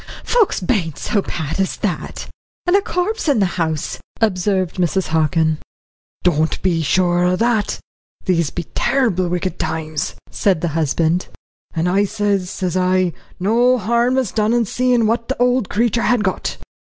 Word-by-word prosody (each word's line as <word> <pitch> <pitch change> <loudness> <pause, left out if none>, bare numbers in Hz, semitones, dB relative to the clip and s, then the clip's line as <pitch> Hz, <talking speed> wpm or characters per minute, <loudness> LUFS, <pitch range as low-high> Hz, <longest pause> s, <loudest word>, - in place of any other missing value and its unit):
"Folks 470 -5 +2
bain't 180 - -1
so 205 - 0
bad 160 -2 -4
as 190 - 0
that, - - -3 0.4
and 355 +1 +3
a 400 - +5
corpse 395 +3 -2
in 280 - +3
the 200 - +3 0.2
house," 160 -2 -2 0.2
observed 190 -4 +1
Mrs. 185 +1 0
Hockin. 160 0 +2 0.6
"Don't 160 -3 +2
be 175 -3 +2
sure 175 +2 +2
o' 180 +1 +3
that 225 0 +1 0.5
these 170 -5 +2
be 175 - -4
terrible 205 -10 +1
wicked 180 +1 -2
times," 155 -1 -3 0.2
said 190 -6 +1
the 175 - 0
husband. 160 +3 0 0.5
"And 165 +2 +1
I 195 +3 +3
sez, 200 -3 0
sez 185 -3 -3
I, 185 -1 +2 0.3
no 240 +6 +3
harm 235 +4 +1
is 255 -7 0
done 215 +1 +1
in 240 -1 +2
seein' 245 +1 +2
what 230 +2 0
the 265 - -3
old 250 -3 +2
creetur 235 +1 +1
had 240 -2 +2
got." 190 - -2
190 Hz, 160 wpm, -19 LUFS, 175-235 Hz, 0.6 s, a